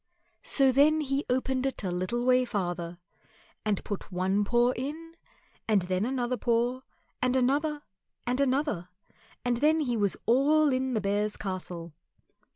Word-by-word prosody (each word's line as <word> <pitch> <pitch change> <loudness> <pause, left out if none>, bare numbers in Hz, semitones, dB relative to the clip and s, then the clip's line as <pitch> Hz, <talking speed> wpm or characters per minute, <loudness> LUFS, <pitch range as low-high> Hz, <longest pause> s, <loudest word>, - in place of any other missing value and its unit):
So 270 -2 +4
then 300 +4 +4
he 275 0 -1
opened 260 +1 0
it 265 - -5
a 185 - -1
little 185 +8 -2
way 255 0 +4
farther, 175 -7 -3 0.7
and 210 -3 -1
put 205 -2 -6
one 190 +3 +1
paw 240 +3 +3
in, 310 +6 -6 0.5
and 210 -4 +3
then 185 +3 0
another 250 -1 -1
paw, 240 +3 0 0.4
and 255 0 +2
another 290 +4 +1 0.4
and 250 +2 0
another, 265 - 0 0.6
and 245 -1 +1
then 310 +4 +3
he 245 -5 0
was 205 -3 +1
all 285 +5 +4
in 260 -1 -1
the 215 - +1
Bears' 205 +1 0
Castle. 180 -4 -5
245 Hz, 150 wpm, -28 LUFS, 200-270 Hz, 0.7 s, So